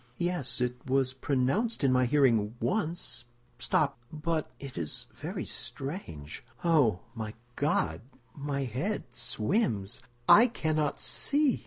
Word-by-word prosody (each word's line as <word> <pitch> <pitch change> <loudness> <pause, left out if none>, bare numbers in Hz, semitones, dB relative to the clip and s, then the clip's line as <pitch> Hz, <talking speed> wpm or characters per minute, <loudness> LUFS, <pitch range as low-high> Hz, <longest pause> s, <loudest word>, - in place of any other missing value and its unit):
"Yes, 175 -8 0
it 125 0 -1
was 130 -1 +2
pronounced 140 - 0
in 135 - +5
my 125 -1 +4
hearing 120 -6 +3
once. 155 - -2 0.3
Stop—but—it 145 +1 -1
is 80 -3 -1
very - - -5
strange—oh, 130 - -1
my 110 -2 -5 0.2
God, 80 - +1 0.3
my 140 -1 -2
head 135 - -2
swims! 120 - 0 0.3
I 230 +4 +9
cannot 155 - 0
see!" 290 -2 +1
135 Hz, 105 wpm, -30 LUFS, 120-160 Hz, 0.3 s, I